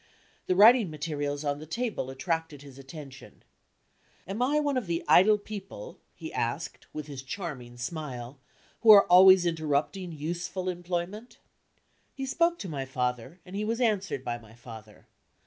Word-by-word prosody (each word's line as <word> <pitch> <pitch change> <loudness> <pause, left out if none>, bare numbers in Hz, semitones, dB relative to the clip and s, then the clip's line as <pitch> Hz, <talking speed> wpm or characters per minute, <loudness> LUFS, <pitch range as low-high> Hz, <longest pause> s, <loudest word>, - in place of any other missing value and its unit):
The 185 - +2
writing 220 +1 +7
materials 145 -2 -4
on 145 0 -1
the 155 - -10
table 220 - -3
attracted 160 +1 -3
his 140 -1 -13
attention. 135 -1 -12 0.8
"Am 200 +5 -4
I 285 +4 +2
one 290 -2 0
of 250 -7 -2
the 170 0 -2
idle 210 +4 +6
people," 200 - -9 0.2
he 160 -2 -8
asked, 145 +7 -3
with 155 -1 -6
his 140 -3 -8
charming 135 -6 -7
smile, 130 -2 -6 0.4
"who 230 - +2
are 205 -2 +10
always 185 0 +7
interrupting 165 +3 -1
useful 175 +4 -4
employment?" 180 +5 -5 0.8
He 270 - -4
spoke 335 +5 +1
to 195 - -5
my 145 -5 -4
father, 125 +4 -3
and 185 +1 -10
he 205 - -2
was 225 +2 -2
answered 200 - 0
by 120 -1 -3
my 115 -1 -17
father. 110 -3 -13
165 Hz, 155 wpm, -28 LUFS, 135-200 Hz, 0.8 s, are